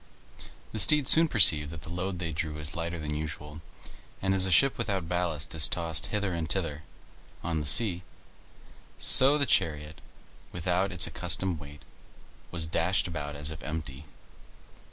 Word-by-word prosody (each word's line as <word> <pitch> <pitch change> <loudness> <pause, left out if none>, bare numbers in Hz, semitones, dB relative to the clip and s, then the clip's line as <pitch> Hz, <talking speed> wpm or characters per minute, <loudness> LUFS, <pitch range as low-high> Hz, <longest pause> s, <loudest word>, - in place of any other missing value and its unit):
The 110 - -3
steeds 150 +4 +6
soon 165 +1 +6
perceived 90 - +5
that 80 -1 -10
the 80 - -9
load 90 +1 -4
they 85 -2 -5
drew 75 0 -5
was 75 0 -3
lighter 85 +1 -5
than 75 -2 -6
usual; 75 0 -7 0.6
and 95 0 -1
as 95 -1 +3
a - - -3
ship 135 +8 +3
without 100 -7 -3
ballast 85 -3 -3
is 80 -2 +5
tossed 80 -3 -1
hither 100 -3 -3
and 80 -2 -4
thither 80 -4 -3 0.6
on 80 -1 -2
the 75 - -3
sea, 90 - +5 1.0
so 135 +3 +4
the 140 - +1
chariot, 75 - -2 0.5
without 90 +3 -2
its 90 -1 -4
accustomed 95 -4 -1
weight, 75 0 -13 0.7
was 85 -2 +1
dashed 85 +4 -1
about 75 -4 -6
as 75 +1 -5
if 80 - -10
empty. 75 -3 -7
85 Hz, 160 wpm, -27 LUFS, 75-95 Hz, 1.0 s, steeds